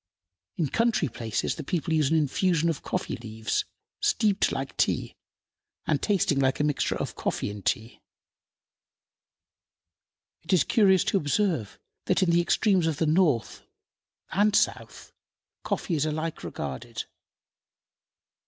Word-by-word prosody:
In 160 - +1
country 230 - +1
places 110 -1 -2
the - - -7
people 165 +1 -2
use 155 -4 +2
an 160 - +3
infusion 165 +3 +1
of 160 - -2
coffee - - -3
leaves, 110 -1 -3 0.3
steeped 220 - +2
like 135 0 -4
tea - - 0 0.7
and 145 - 0
tasting 185 -8 +1
like 135 -1 +1
a - - +2
mixture 150 -1 0
of - - -4
coffee - - -2
and 100 -1 -9
tea. 115 +2 -2 2.4
It 180 +4 -3
is 180 - +5
curious 190 -5 +4
to - - +1
observe 155 - 0 0.3
that - - +2
in 175 - +2
the 170 0 +4
extremes 185 -1 +2
of 160 -3 -1
the 160 - +1
North 155 -7 +1 0.7
and 205 +3 +3
South - - -1 0.5
coffee 180 - -2
is 155 -1 +1
alike 155 +1 -3
regarded. 70 -3 -5
160 Hz, 135 wpm, -27 LUFS, 135-190 Hz, 2.4 s, is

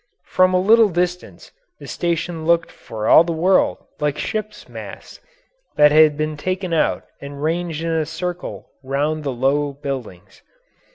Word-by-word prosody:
From 185 0 +3
a - - +4
little 220 +3 +5
distance 180 0 -3 0.3
the - - -12
station 170 -1 -3
looked 170 0 +2
for 110 -1 -6
all 160 - +7
the 170 - -4
world 180 +4 +1
like 150 -1 -1
ships' 215 -1 -5
masts - - -10 0.6
that 150 0 +6
had 155 -1 +5
been 155 0 -2
taken 185 +3 -3
out 160 - +1 0.2
and 140 0 -8
ranged 165 0 -2
in 165 - -1
a 160 -2 0
circle 175 +2 -6
round 145 +3 -2
the 140 - -2
low 140 +3 0
buildings. 135 -10 -7
160 Hz, 155 wpm, -20 LUFS, 145-175 Hz, 0.6 s, all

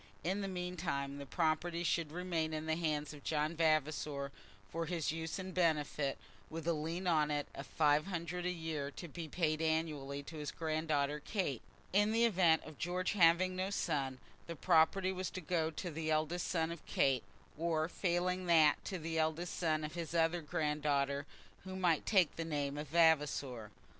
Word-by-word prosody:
In 190 +5 0
the 195 - -2
meantime 170 -7 -3
the 140 - -7
property 165 +2 0
should 170 -3 0
remain 165 -2 -1
in 155 0 -4
the 160 0 +1
hands 155 -3 -1
of 145 -2 -12
John 155 +1 0
Vavasor 155 -3 +1 0.4
for 165 +5 -3
his 165 -3 -1
use 160 +1 -4
and 190 -1 -6
benefit, 150 -5 +1 0.3
with 165 0 -6
a 170 - +3
lien 165 +4 -3
on 155 -4 +3
it 145 -1 -1
of 140 - -7
five 150 +1 +3
hundred 175 -1 -3
a - - +1
year 160 -5 -3
to 170 +4 -8
be 165 +1 -6
paid 155 -1 0
annually 155 -3 -1
to 160 +2 -9
his 150 -1 -4
granddaughter 155 -2 0
Kate. 150 - -2 0.3
In 205 +2 +4
the 230 +1 +4
event 175 -7 +4
of 155 -2 -11
George 180 +1 -1
having 185 -1 +4
no 185 +1 -1
son, 140 -9 -1 0.3
the 170 - -5
property 180 +3 +3
was 185 0 -3
to - - -6
go 165 -1 0
to 170 +2 -5
the 160 0 -3
eldest 155 +3 0
son 165 -2 0
of 170 - -7
Kate, 135 -3 +2 0.3
or 160 0 0
failing 180 +1 0
that 160 -3 +5
to 190 - -3
the 165 -1 -2
eldest 160 +2 0
son 155 -3 0
of 150 - -4
his 170 -1 -4
other 165 +1 +2
granddaughter 145 -2 0 0.4
who 190 0 -6
might 175 -4 +1
take 185 -7 +3
the 165 - -1
name 145 -3 -2
of 150 +1 -5
Vavasor. 145 -7 +2
160 Hz, 185 wpm, -35 LUFS, 150-175 Hz, 0.4 s, that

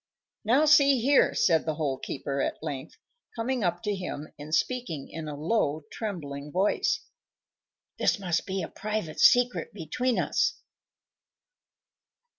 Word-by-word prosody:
"Now, 255 +8 +4
see 280 -3 +6
here," 270 +4 +4
said 165 -3 +3
the 155 - 0
Hole 140 -4 -2
keeper, 140 0 -3
at - - -3
length, 140 -4 -6 0.4
coming 240 +1 -1
up 175 -1 -1
to 210 - 0
him 180 -6 -5
and 150 +1 -8
speaking 170 - -2
in 160 -1 -7
a 150 - -5
low, 155 -3 0
trembling 150 -9 -5
voice. 190 +5 +1 1.0
"This - - +3
must 180 -4 -1
be 190 -1 -2
a - - -3
private 210 -7 -4
secret 245 -2 +4
between 230 +9 -1
us. - - +1
180 Hz, 135 wpm, -28 LUFS, 155-230 Hz, 1.0 s, see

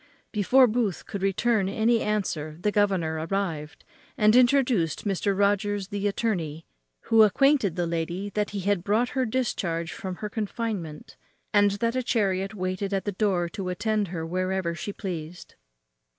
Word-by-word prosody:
Before 245 +5 +5
Booth 225 -5 -1
could 200 - -6
return 195 +1 +1
any 225 +3 +2
answer 165 -8 -2
the 210 +4 0
governor 190 -7 +1
arrived, 165 -7 -3 0.3
and 215 +1 +5
introduced 245 - +3
Mr. 200 0 0
Rogers 205 -1 +1
the 205 0 -1
attorney, 175 -8 -2 0.4
who 225 -1 +4
acquainted 220 - +4
the 175 -1 0
lady 170 +4 -3
that 210 +1 -1
he 200 -1 -4
had 195 -2 0
brought 220 +5 +1
her 260 -3 -1
discharge 175 -9 -2
from 185 -1 -5
her 210 - -5
confinement, 205 -7 -4 0.4
and 205 -1 +5
that 230 +1 +1
a 255 - +1
chariot 195 -4 0
waited 185 +1 -2
at 195 - -2
the 205 - -1
door 185 -3 0
to 185 +1 -5
attend 210 +2 0
her 165 -2 -4
wherever 185 0 -1
she 190 +4 -5
pleased. 175 -4 -7
200 Hz, 155 wpm, -26 LUFS, 180-215 Hz, 0.4 s, Before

